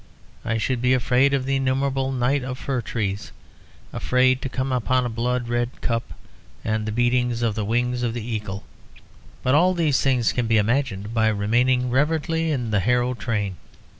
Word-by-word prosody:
I 115 -1 -1
should 120 +2 -1
be 125 +1 +3
afraid 130 +2 +3
of 135 -2 0
the 135 0 +1
innumerable 135 0 0
night 130 +2 +1
of 125 0 -4
fir 130 -2 -2
trees, 100 -2 -3 0.6
afraid 130 0 +2
to 135 - -3
come 130 +1 -2
upon 125 0 +1
a - - -1
blood 120 +2 -1
red 120 +1 -2
cup 115 -1 -2 0.5
and 110 0 -1
the - - -1
beating 120 +2 +2
of 115 -2 +1
the 110 - -2
wings 120 +3 0
of 120 -1 -1
the 120 - -4
Eagle. 105 -3 -4 0.8
But 130 - +2
all 180 +5 +4
these 155 -6 +2
things 125 -4 +2
can 120 -2 -1
be 110 0 +3
imagined 110 -2 0
by 110 -1 +2
remaining 120 +4 +2
reverently 160 +4 +1
in 125 -7 -1
the 105 - +2
Harrow 125 +5 +1
train." 105 -4 -2
125 Hz, 180 wpm, -23 LUFS, 115-130 Hz, 0.8 s, all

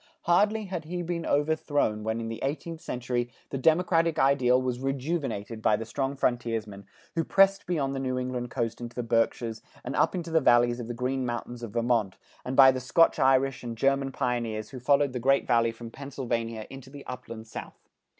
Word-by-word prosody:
Hardly 210 +5 +3
had 180 -4 -5
he 175 +2 -4
been 170 -1 -3
overthrown 145 -7 +1
when 110 +1 -1
in 115 - -4
the 115 0 -6
eighteenth 160 +4 -3
century, 120 0 -2 0.2
the 135 - -2
democratic 165 +2 +3
ideal 130 -2 +4
was 125 -1 -2
rejuvenated 135 -5 -3
by 110 - +4
the 115 - -4
strong 135 +4 -2
frontiersmen, 115 -6 -2 0.3
who 165 - 0
pressed 195 +2 +3
beyond 145 -6 0
the 135 - -3
New 130 -1 -1
England 125 -1 -3
Coast 115 -2 -3
into 120 0 -7
the 125 - -2
Berkshires 115 -1 0 0.2
and - - -4
up - - +3
the 165 -3 0
valleys 120 -1 +4
of 120 - -5
the 120 - -4
Green 130 +2 -1
Mountains 120 0 -4
of 115 -3 -7
Vermont, 115 -4 +1 0.3
and 130 - -4
by 135 -1 +9
the 130 - -3
Scotch 165 +6 +3
Irish 135 -1 +3
and 115 -2 -5
German 135 +2 +1
pioneers 115 -4 -2
who 130 - -7
followed 140 +1 +2
the 125 - -2
Great 135 +3 +3
Valley 115 -2 +3
from 115 0 -10
Pennsylvania 115 -5 -4
into 135 -1 -10
the 140 0 -11
Upland 115 -3 -8
South. 110 - -10
125 Hz, 190 wpm, -28 LUFS, 115-140 Hz, 0.3 s, by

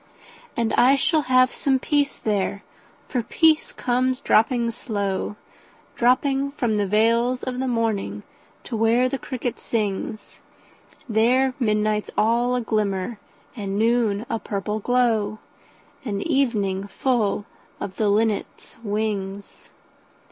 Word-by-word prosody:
And 230 -1 0
I 260 +3 +5
shall 310 +3 +2
have 255 0 +5
some 270 -2 +1
peace 285 +1 0
there, 200 -1 -1 0.4
for 250 - -1
peace 315 +6 +2
comes 255 +1 0
dropping 235 -1 +2
slow, 205 -4 -3 0.6
Dropping 270 +3 +2
from 235 -7 0
the 205 -1 0
veils 230 +5 +2
of 255 -1 -3
the 265 - -1
morning 220 - -1 0.4
to 240 - -5
where 225 +3 +3
the 265 +1 -3
cricket 245 -1 -4
sings; 215 -1 -3 0.7
There 250 +4 +3
midnight's 210 -2 +1
all 240 +3 +2
a 250 - 0
glimmer, 210 -1 -1 0.4
and 200 -3 -3
noon 225 -1 +1
a 230 - -2
purple 210 +1 -3
glow, 220 -3 +1 0.7
And 205 -5 -3
evening 210 - 0
full 215 -4 0 0.3
of 200 -2 -6
the 215 -2 +2
linnet's 215 +1 -1
wings. 205 -2 -4
225 Hz, 120 wpm, -23 LUFS, 205-250 Hz, 0.7 s, I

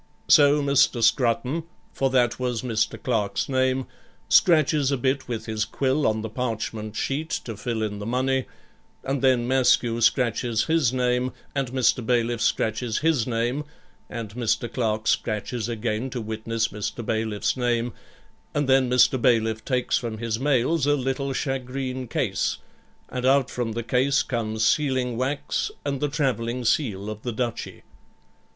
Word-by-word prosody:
So 145 0 +6
Mr. 140 -4 +3
Scrutton, 125 +5 +2 0.3
for 135 - +1
that 125 -2 +2
was 125 -2 -2
Mr. 115 -3 -1
Clerk's 105 -5 0
name, 130 -1 +1 0.4
scratches 155 -4 +4
a 140 - +1
bit 130 +2 -1
with 115 -3 -4
his 110 -1 -1
quill 135 +6 0
on 110 0 0
the - - -2
parchment 110 -2 -4
sheet 145 +7 -2 0.2
to 115 - -5
fill 110 +1 -3
in 105 -1 -3
the 105 - -5
money, 130 +2 0 0.6
and 135 0 -2
then 125 -3 +3
Maskew 125 -2 +2
scratches 115 -1 +2
his 160 -6 +2
name, 125 0 0 0.2
and 135 -3 -1
Mr. 125 -1 +2
Bailiff 120 0 0
scratches 110 +1 0
his 150 -8 +2
name, 120 +4 -1 0.5
and 115 -4 -6
Mr. 115 0 -1
Clerk 110 -3 -1
scratches 110 +2 -1
again 115 +2 -2
to 125 - -4
witness 110 +1 -2
Mr. 105 +2 -5
Bailiff's 110 -2 -1
name, 120 -1 0 0.6
and 145 -2 +1
then 130 -1 +4
Mr. 125 0 +4
Bailiff 110 -2 +2
takes 125 +1 0
from 115 -4 -5
his 115 0 -2
mails 145 +2 +1
a 145 - +4
little 135 0 -2
shagreen 130 -1 -3
case, - - -1 0.5
and 125 - -4
out 135 0 +3
from 120 -3 -2
the 120 +1 -3
case 130 +4 +2
comes 110 -2 -1
sealing 130 -3 +1
wax 135 +4 -1 0.2
and 140 -2 -2
the 150 - +1
travelling 125 -4 -1
seal 105 -7 0
of 110 0 -6
the 120 - -3
Duchy. 120 0 -4
125 Hz, 155 wpm, -25 LUFS, 115-135 Hz, 0.6 s, So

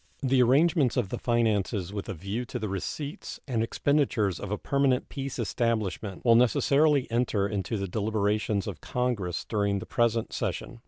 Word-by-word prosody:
The 130 -1 +3
arrangements 140 +2 +3
of 115 -7 0
the - - -4
finances 105 -5 0
with 100 -2 -5
a - - -3
view 100 +8 -4
to 125 - -5
the 110 -3 -3
receipts 140 - -5
and 120 -5 0
expenditures 115 - +1
of 100 - -6
a 105 - -1
permanent 135 0 +1
peace 135 -1 -5
establishment 110 -4 -2
will 115 - +7
necessarily 140 +4 +4
enter 115 -4 +1
into 100 +1 -2
the 100 -1 -3
deliberations 105 0 0
of 105 -5 -6
Congress 115 -9 -2
during 100 -2 0
the 95 - -5
present 115 -1 0
session. 120 - -3
115 Hz, 165 wpm, -28 LUFS, 100-125 Hz, -, will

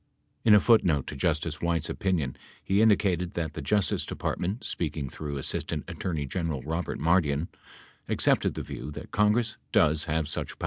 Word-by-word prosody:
In 105 -2 +7
a - - +8
footnote 90 - +3
in 70 - -8
Justice 80 0 -1
White's 85 -2 0
opinion 90 - -1 0.3
he 100 +2 +2
indicated 95 -5 +2
that 80 -3 -2
the - - -5
Justice 105 -2 +1
Department, 95 +7 -3
speaking 75 -4 -3
through 75 -2 -5
Assistant 70 - -1
Attorney 80 -5 -3
General 80 -3 -3
Kobert 80 +4 -3
Mardian, 80 -1 +2 0.6
accepted - - +2
the - - -4
view - - -7
that 75 - -9
Congress 110 +2 +2
does 75 +1 +3
have 80 -1 -1
such - - -4
power. - - -40
85 Hz, 165 wpm, -28 LUFS, 75-95 Hz, 0.6 s, a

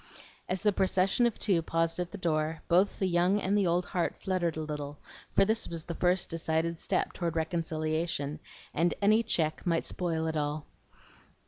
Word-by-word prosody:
As 185 +2 -1
the 210 -1 +4
procession 190 +5 +3
of 235 - -3
two 190 -5 +2
paused 165 +1 0
at 175 -1 -2
the - - -6
door, 160 -3 -1
both 185 +4 +3
the 190 - 0
young 180 +3 +3
and 200 0 0
the 200 -3 +3
old 175 +1 +1
heart 180 -3 -1
fluttered 180 -4 -1
a - - -2
little, 150 -1 -5 0.4
for 195 - +6
this 220 +2 +1
was 165 -2 -5
the 170 - -5
first 180 +2 +1
decided 165 0 -1
step - - 0
toward 170 -2 -2
reconciliation, 160 -2 -1 0.3
and 170 +2 +2
any 215 +2 +4
check 165 -9 -1
might 170 -2 +1
spoil 165 -3 -1
it 160 0 -2
all. 150 0 -2
170 Hz, 185 wpm, -30 LUFS, 160-185 Hz, 0.4 s, for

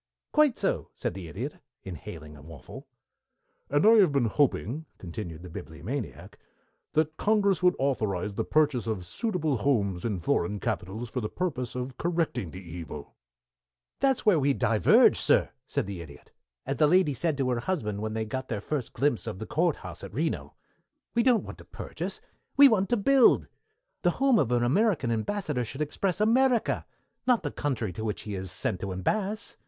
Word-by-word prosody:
"Quite 300 -5 +4
so," - - -1
said - - -3
the 90 -2 -7
Idiot, 120 - -5 0.3
inhaling 80 -4 -8
a 75 - -13
waffle. 80 0 -11 0.8
"And 145 +5 +2
I - - +9
have 190 -7 +6
been 140 -4 +2
hoping," 145 +4 0
continued 85 -2 -7
the - - -8
Bibliomaniac, 120 - -6 0.5
"that 155 0 +1
Congress 205 -3 +2
would 180 0 +4
authorize 105 -8 -1
the - - -1
purchase 145 -7 +1
of 100 -5 -2
suitable 160 - -1
houses 100 -8 0
in 110 -4 -1
foreign 85 +4 0
capitals 110 +6 -3
for 125 - -2
the 105 - -3
purpose 135 -10 -3
of 125 0 -5
correcting 165 - -1
the 90 - -9
evil." 80 -3 -8 0.9
"That's 270 -3 +2
where 200 -7 +5
we 140 0 +2
diverge, 110 -1 +5
sir," - - +3 0.2
said - - -1
the 95 -3 -6
Idiot, 75 -3 -13 0.3
"as 135 - -2
the 150 - +5
lady 175 -2 +4
said 155 +2 0
to 130 -2 0
her 120 - 0
husband, 110 - -2
when 110 0 -3
they 110 0 -2
got 130 +4 -4
their 110 - -2
first 130 +3 -4
glimpse 140 -4 0
of - - -4
the 110 - -6
courthouse 165 +4 -1
at 100 +1 -9
Reno. 160 +4 -2 0.6
We 235 - +3
don't 240 -2 +4
want - - -9
to - - -11
purchase. - - -6 0.4
We 285 0 +10
want 195 -6 +2
to 240 - +2
build. 265 +4 +5 0.6
The 175 - +3
home 270 -4 +4
of 125 - +1
an 120 -1 +2
American 150 - +2
Ambassador 140 - -1
should 120 +4 -7
express 180 +5 -2
America, 240 +2 +2 0.4
not 250 -3 +3
the - - -2
country 125 -9 -2
to 110 - -5
which 105 -2 -3
he 105 - -5
is 95 -1 -4
sent 95 0 -2
to 95 - -4
Ambass. 205 - -1
130 Hz, 180 wpm, -28 LUFS, -, 0.9 s, We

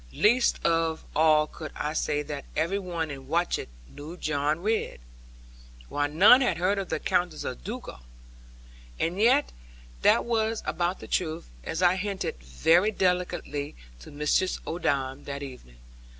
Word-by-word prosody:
Least 235 +4 +3
of 165 -1 +1
all 155 0 +5
could 155 0 -9
I 150 +1 -2
say 150 -2 0
that 145 -1 -6
every 170 +6 0
one 170 -5 -3
in 135 -2 -9
Watchett 170 +4 0 0.2
knew 150 - -10
John 150 0 0
Ridd; 215 - -1 0.9
while 145 0 0
none 200 - +7
had 190 -10 +1
heard 190 +3 +1
of 195 - -4
the 160 - -1
Countess 175 -3 0
of - - -5
Dugal. 60 - -7 1.0
And 175 +4 -1
yet 255 +7 +4 0.5
that - - +4
was 225 -1 0
about 175 +2 -1
the - - -9
truth, 165 -1 -2
as 165 - -2
I 180 +1 +5
hinted 190 - -3
very 160 - +3
delicately 180 -7 -1 0.2
to - - -12
Mistress 150 +5 0
Odam 140 -5 -2
that 140 0 -5
evening. 125 - -11
165 Hz, 150 wpm, -27 LUFS, 145-185 Hz, 1.0 s, none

